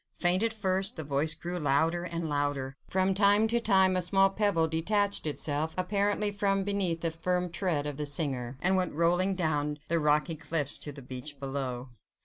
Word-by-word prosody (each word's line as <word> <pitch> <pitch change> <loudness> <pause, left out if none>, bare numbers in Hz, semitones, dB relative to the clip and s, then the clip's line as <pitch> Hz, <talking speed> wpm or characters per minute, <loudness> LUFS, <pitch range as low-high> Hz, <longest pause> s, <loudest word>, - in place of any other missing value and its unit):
Faint 180 +2 +2
at 230 0 +1
first, 195 -3 -1
the 160 - -3
voice 150 +2 0
grew 175 +2 -4
louder 160 +4 +1
and 170 -2 -3
louder; 145 -2 -1
from 190 +1 +2
time 205 +2 +4
to 235 +2 +1
time 190 -4 +3
a 185 - +1
small 195 +2 +3
pebble 195 -6 +1
detached 200 +4 0
itself 150 +1 -1
apparently 205 +2 0
from 195 -1 0
beneath 190 -4 -1
the 165 - -1
firm 180 +2 -1
tread 175 -5 -1
of 145 -2 -4
the 150 - -3
singer, 135 -4 -2
and 190 +1 +3
went 180 -5 -1
rolling 175 +4 +2
down 150 -4 -1
the 170 0 +2
rocky 150 +2 +2
cliffs 150 -2 0
to 145 - -5
the 140 -1 -11
beach 130 +3 -7
below. 135 -2 -4
170 Hz, 185 wpm, -29 LUFS, 145-190 Hz, -, time